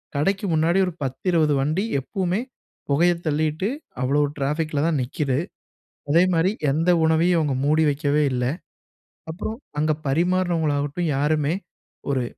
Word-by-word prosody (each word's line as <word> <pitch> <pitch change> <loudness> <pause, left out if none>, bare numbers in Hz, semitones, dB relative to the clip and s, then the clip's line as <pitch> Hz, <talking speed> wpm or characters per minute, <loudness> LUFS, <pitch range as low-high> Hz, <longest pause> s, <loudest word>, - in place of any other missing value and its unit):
கடைக்கு 195 +8 0
முன்னாடி 165 +4 +2
ஒரு 180 - -4
10, 130 +4 -5
20 155 -4 +3
வண்டி 155 +9 0 0.2
எப்பவுமே 190 - -2 0.5
புகைய 170 +5 +4
தள்ளீட்டு 155 +4 0 0.3
அவ்வளோ 140 +3 +2 0.2
ட்ராஃபிக்ல 150 +2 -1
தான் 160 -4 +1
நிக்குது. 135 +1 -1 0.7
அதேமாரி, 175 +2 +3 0.2
எந்த 165 +5 +1
உணவையும் 165 +2 +3
அவங்க 145 -4 0
மூடி 155 +2 +3
வைக்கவே 145 +1 +1
இல்ல. 125 -1 -1 0.9
அப்புறம் 210 +7 -5 0.2
அங்க 155 +1 +2 0.2
பரிமாறுனவங்களாகட்டும் 165 -1 0
யாருமே 150 +2 +1 0.6
ஒரு 130 -2 0
155 Hz, 120 wpm, -23 LUFS, 145-175 Hz, 0.9 s, புகைய